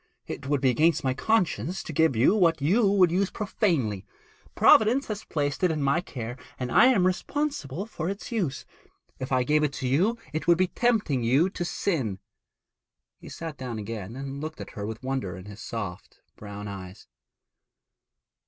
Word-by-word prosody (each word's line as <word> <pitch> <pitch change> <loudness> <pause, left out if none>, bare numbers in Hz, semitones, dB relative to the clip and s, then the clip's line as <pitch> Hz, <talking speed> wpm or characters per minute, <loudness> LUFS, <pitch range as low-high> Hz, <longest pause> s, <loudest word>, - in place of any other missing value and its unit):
'It - - -6
would 145 -2 +1
be 130 -2 +4
against 155 +7 +2
my 130 -1 +1
conscience 180 - 0
to 160 - -7
give 160 -3 +3
you 115 - +4
what 170 -7 +3
you 195 +10 +3
would 185 -4 +4
use 190 +2 +1
profanely. 155 - -1 0.5
Providence 240 +6 +5
has 215 -1 -5
placed 145 +2 -2
it 180 - +5
in 160 -1 -1
my 140 +5 +2
care, 120 -5 -6 0.2
and 125 -1 -4
I 250 - +7
am 230 -9 +4
responsible 190 - -2
for 175 -6 -4
its 200 +5 -6
use. 180 - -2 0.5
If 130 +1 -5
I 130 -1 +3
gave 150 +4 +2
it 150 -2 0
to 130 - -3
you 185 - +2 0.2
it 155 0 -3
would 170 -1 +6
be 185 - +3
tempting 215 - +1
you 140 +11 +3
to 175 - -3
sin.' 145 - -1 1.0
He - - -11
sat 160 -3 -7
down 125 -3 -5
again 110 0 -6
and 135 +1 -6
looked 155 +1 -6
at - - -8
her 105 -1 -5
with 110 +3 -7
wonder 130 -9 -3
in 90 - -10
his 105 +1 -10
soft 105 -6 -6 0.2
brown 105 0 -8
eyes. 95 -1 -9
145 Hz, 180 wpm, -27 LUFS, 120-185 Hz, 1.0 s, I